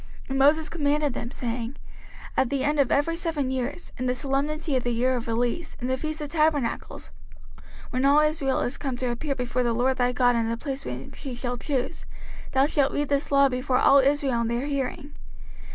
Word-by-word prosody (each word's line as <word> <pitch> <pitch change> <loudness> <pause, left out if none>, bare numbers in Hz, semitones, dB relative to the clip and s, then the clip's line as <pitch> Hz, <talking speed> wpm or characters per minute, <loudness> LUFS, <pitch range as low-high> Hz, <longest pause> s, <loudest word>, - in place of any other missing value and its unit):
05:031:010 - - -20
And 270 - 0
Moses 305 +3 +4
commanded 295 -3 0
them, 235 - -4
saying, 240 0 -4 0.6
At 260 - +2
the 275 0 -1
end 295 0 +1
of 275 - +3
every 310 +4 +2
seven 320 -6 -1
years, 265 +6 -3
in 255 - -1
the 250 - +1
solemnity 290 +3 -1
of 255 - +2
the 245 - -1
year 250 +2 +1
of 240 -1 -4
release, 245 +8 -1
in 245 - -4
the 260 - +2
feast 310 +3 -4
of 295 -1 -5
tabernacles, 305 -6 0 0.5
05:031:011 - - -19 0.3
When 255 +2 0
all 285 +2 +6
Israel 305 -3 +1
is 245 - -2
come 265 -4 -3
to 250 -1 -1
appear 275 +4 -2
before 250 0 -1
the 240 -1 +1
LORD 255 +2 +1
thy 250 0 +2
God 245 -1 +3
in 230 -1 +1
the 230 - -1
place 270 +2 -5
which 125 +1 -7
he 270 -4 -6
shall 245 0 -3
choose, 265 +3 -3 0.5
thou 270 +1 +4
shalt 285 -2 +2
read 290 -1 -1
this 280 0 0
law 280 0 +6
before 255 0 0
all 280 - +6
Israel 270 -3 +2
in 230 - 0
their 235 +3 -1
hearing. 285 +1 -3
270 Hz, 215 wpm, -26 LUFS, 245-290 Hz, 0.6 s, all